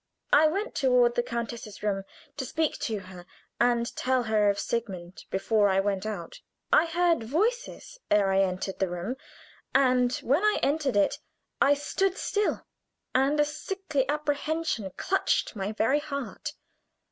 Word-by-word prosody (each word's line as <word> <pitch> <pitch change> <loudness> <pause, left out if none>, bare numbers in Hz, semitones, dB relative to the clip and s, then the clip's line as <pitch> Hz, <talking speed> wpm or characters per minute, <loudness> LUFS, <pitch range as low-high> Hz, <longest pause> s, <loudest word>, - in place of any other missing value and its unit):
I 305 +2 +7
went 400 +9 -2
toward 250 -3 +3
the 240 - +1
countess's 235 -3 -5
room, 195 -2 -1 0.3
to 285 - -3
speak 315 +4 -1
to 220 -2 -2
her, 185 -1 -11 0.4
and 235 -1 +2
tell 255 -1 +1
her 215 -2 +3
of 200 - +1
Sigmund 190 -6 -4
before 205 +2 +2
I 190 0 +3
went 195 +1 -1
out. 190 -6 -6 0.3
I 335 - +6
heard 335 -4 +2
voices 455 - -2
ere 200 -2 +3
I 190 0 +4
entered 185 0 -2
the 190 - +1
room, 180 +8 -4 0.6
and 255 -2 +4
when 280 +7 +2
I 425 0 +3
entered 285 -3 +1
it 200 - +2 0.4
I 280 +1 +6
stood 380 +7 -1
still, 415 0 -1 0.5
and 275 +3 +2
a 295 - +5
sickly 300 -3 -3
apprehension 300 -5 -1
clutched 385 -9 0
my 200 0 -3
very 225 +6 +2
heart. 280 -2 -5
250 Hz, 150 wpm, -27 LUFS, 205-300 Hz, 0.6 s, I